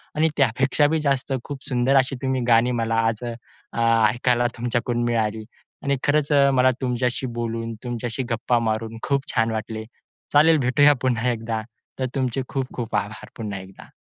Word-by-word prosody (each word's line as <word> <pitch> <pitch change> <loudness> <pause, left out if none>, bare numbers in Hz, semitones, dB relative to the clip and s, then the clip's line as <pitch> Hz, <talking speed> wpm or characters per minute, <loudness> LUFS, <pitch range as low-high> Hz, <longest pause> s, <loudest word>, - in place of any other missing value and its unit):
आणि 155 +1 +3
त्यापेक्षा 135 +3 +3
बी 160 +2 +1
जास्त 140 -2 0
खूप 140 -2 -7
सुंदर 125 +1 +2
अशी 135 +1 +2
तुम्ही 130 -1 0
गाणी 120 +1 +4
मला 115 0 0
आज 115 +1 -2
अ, 120 -1 -3 0.8
ऐकायला 120 +1 +1
तुमच्याकडून 120 0 -1
मिळाली 110 -2 0 0.4
आणि 140 -1 +1
खरंच 145 0 +1
अ, 140 -1 +5
मला 130 0 +5
तुमच्याशी 125 0 -1
बोलून, 115 0 -3
तुमच्याशी 120 +1 -3
गप्पा 120 +1 +1
मारून 110 0 -2
खूप 140 -1 0
छान 115 0 +2
वाटले. 110 0 -4 0.5
चालेल 155 +2 +6
भेटूया 145 +3 +6
पुन्हा 125 -1 +1
एकदा. 115 -1 -3 0.4
तर 130 - 0
तुमचे 130 -1 0
खूप-खूप 130 -3 -4
आभार 105 +2 -3
पुन्हा 105 -4 -4
एकदा. 95 +1 -13
120 Hz, 160 wpm, -23 LUFS, 115-135 Hz, 0.8 s, चालेल